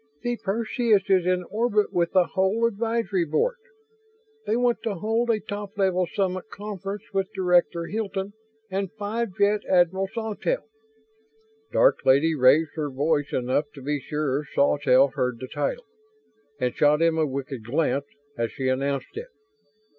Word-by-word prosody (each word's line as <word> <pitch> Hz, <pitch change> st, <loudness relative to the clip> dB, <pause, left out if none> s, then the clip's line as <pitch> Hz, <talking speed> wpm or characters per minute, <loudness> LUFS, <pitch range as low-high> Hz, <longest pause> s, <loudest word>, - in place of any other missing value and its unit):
"The 240 Hz, 0 st, 0 dB
Perseus 220 Hz, 0 st, +1 dB
is 185 Hz, -2 st, +3 dB
in 180 Hz, 0 st, +1 dB
orbit 215 Hz, -1 st, +1 dB
with 170 Hz, -1 st, +1 dB
the 185 Hz, -2 st, +5 dB
whole 190 Hz, +4 st, +2 dB
Advisory 225 Hz, -3 st, 0 dB
Board. 325 Hz, -, 0 dB, 0.9 s
They 220 Hz, -, +2 dB
want 240 Hz, -2 st, +2 dB
to 225 Hz, -3 st, -2 dB
hold 225 Hz, +6 st, 0 dB
a 225 Hz, -2 st, +2 dB
top 205 Hz, 0 st, -7 dB
level 185 Hz, -2 st, +2 dB
summit 185 Hz, +1 st, -2 dB
conference 205 Hz, 0 st, -6 dB
with 195 Hz, -1 st, -1 dB
Director 175 Hz, -2 st, +2 dB
Hilton 200 Hz, -1 st, -3 dB, 0.4 s
and 195 Hz, -1 st, -2 dB
Five 215 Hz, -1 st, -3 dB
Jet 205 Hz, +1 st, +3 dB
Admiral 185 Hz, +1 st, +3 dB
Sawtelle." 225 Hz, -, -2 dB, 1.1 s
Dark -, -, +3 dB
Lady 140 Hz, +5 st, +4 dB
raised 145 Hz, +3 st, +4 dB
her 150 Hz, -3 st, -3 dB
voice 145 Hz, +2 st, 0 dB
enough 130 Hz, +4 st, 0 dB
to 135 Hz, -, -10 dB
be 145 Hz, +1 st, -1 dB
sure 150 Hz, 0 st, -2 dB
Sawtelle 140 Hz, -1 st, +4 dB
heard 125 Hz, -2 st, -2 dB
the 130 Hz, -, -6 dB
title, -, -, -3 dB, 0.7 s
and 125 Hz, -2 st, 0 dB
shot 150 Hz, 0 st, +4 dB
him 165 Hz, -1 st, +2 dB
a 155 Hz, -, +2 dB
wicked 135 Hz, -3 st, -5 dB
glance 140 Hz, +3 st, 0 dB, 0.3 s
as 115 Hz, -1 st, -2 dB
she 130 Hz, -1 st, -2 dB
announced 135 Hz, -, -2 dB
it. 470 Hz, +3 st, -6 dB
185 Hz, 150 wpm, -25 LUFS, 145-215 Hz, 1.1 s, the